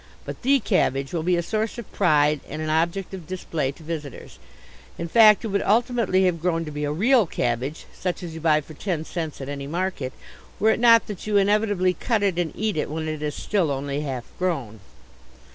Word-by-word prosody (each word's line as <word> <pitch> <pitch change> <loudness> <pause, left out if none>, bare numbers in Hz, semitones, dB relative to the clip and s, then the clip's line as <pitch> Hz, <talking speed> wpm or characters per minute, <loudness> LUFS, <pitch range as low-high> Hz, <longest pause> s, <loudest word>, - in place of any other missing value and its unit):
But - - -7
the 275 +2 +4
cabbage 135 - 0
will 170 - 0
be 180 +2 +2
a 170 - 0
source 220 +5 -2
of 235 - -8
pride 150 -2 +3
and - - -5
an 155 0 -2
object 170 +5 0
of 180 -5 -8
display 165 -6 -2
to 160 - -16
visitors; 150 -4 -7 0.6
in 170 - -4
fact 215 +3 +6
it - - -2
would 200 0 0
ultimately 225 -3 +2
have 170 -3 0
grown 165 -1 0
to 150 - -6
be 150 0 -4
a 145 - -1
real 220 - +3
cabbage, 125 +3 -2
such 180 -1 -4
as 170 -2 -6
you 160 - -8
buy 155 -1 +3
for 155 - -12
ten 160 -1 -3
cents 160 -5 -5
at 135 - -5
any 140 -1 -5
market, 170 -5 -2 0.5
were 220 +1 +4
it - - 0
not 230 -1 +6
that 210 -1 -7
you 210 -1 +2
inevitably 200 -2 +2
cut 220 +4 -1
it 190 -3 +1
and 170 -3 -1
eat 215 -4 -1
it - - -1
when 155 +1 -3
it 155 -1 -4
is 150 -1 -3
still 190 -7 0
only 140 +1 -2
half 130 -5 -4 0.2
grown. 140 - -2
170 Hz, 215 wpm, -24 LUFS, 150-200 Hz, 0.6 s, fact